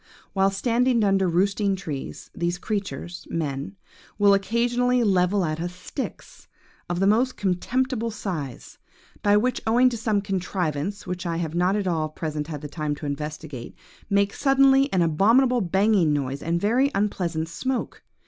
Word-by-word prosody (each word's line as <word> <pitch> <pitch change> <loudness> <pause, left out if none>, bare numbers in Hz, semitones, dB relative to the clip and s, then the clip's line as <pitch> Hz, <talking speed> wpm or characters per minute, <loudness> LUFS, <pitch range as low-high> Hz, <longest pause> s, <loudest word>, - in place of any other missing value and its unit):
While 195 0 +3
standing 235 +3 +1
under 195 -1 +3
our 175 - +1
roosting 195 +3 +1
trees, 155 -8 -7
these 175 +1 -1
creatures, 180 -4 -4
men, 145 +2 -3 0.4
will 200 -1 +5
occasionally 240 +4 +2
level 190 -1 +2
at 155 0 -2
us 175 +1 -4
sticks, 180 +9 -7 0.4
of 175 0 -1
the 195 - +2
most 235 +6 +2
contemptible 230 +5 0
size, 170 - -6 0.4
but 205 0 +4
which, 250 0 0
owing 245 +3 +5
to 235 - -4
some 215 -2 +1
contrivance 185 -2 -2
which 180 -1 -4
I 165 -1 -1
have 165 -2 -3
not 180 +3 +2
at 165 -6 -1
present 150 -2 -3
had 150 -3 -6
the 150 - -5
time 150 0 -3
to 150 - -8
investigate, 150 -3 -5 0.3
make 200 0 +2
suddenly 275 0 +4
an 180 -2 +3
abominable 230 - +3
banging 190 -3 +3
noise 140 -1 -2
and 165 +1 -1
a 175 - -2
very 255 +6 +3
unpleasant 175 -5 -1
smoke. 260 +9 -3
195 Hz, 160 wpm, -24 LUFS, 165-220 Hz, 0.4 s, will